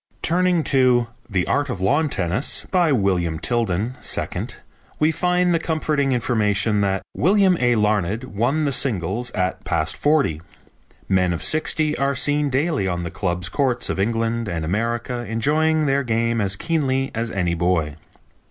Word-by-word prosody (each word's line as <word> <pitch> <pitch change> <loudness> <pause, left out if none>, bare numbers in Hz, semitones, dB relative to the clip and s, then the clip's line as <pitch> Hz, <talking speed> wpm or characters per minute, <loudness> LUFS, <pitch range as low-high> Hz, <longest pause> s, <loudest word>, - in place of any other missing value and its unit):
Turning 180 -1 +2
to 125 -4 +3 0.2
The 90 -4 0
Art 145 -1 0
of 125 - -4
Lawn 145 +12 +1
Tennis, 95 - -1
by 175 -4 +3
William 90 - +1
Tilden, 115 +3 -1
2nd, - - -2 0.4
we 155 +1 +2
find 180 +2 +1
the 165 - +2
comforting 155 -4 0
information 105 -4 +1
that 95 -1 0
"William 190 +2 +3
A. 120 -1 +3
Larned 105 0 0
won 130 +7 -1
the 140 - 0
singles 120 -2 -1
at 90 -1 -2
past 80 -1 0
forty. 145 - +1 0.7
Men 90 -2 +2
of 85 - -3
sixty 155 -1 0
are 140 0 +1
seen 145 +2 +1
daily 140 - 0
on 85 -1 -2
the 85 - -5
clubs' 90 -2 -1
courts 125 +1 0
of - - -4
England 115 +2 -1
and 80 -4 -3
America 115 +6 -2
enjoying 155 +7 +1
their 140 0 +2
game 115 -2 0
as 95 -1 +1
keenly 135 0 -1
as 115 +1 -2
any 90 -5 -1
boy. 85 -3 0
120 Hz, 155 wpm, -21 LUFS, 95-145 Hz, 0.7 s, to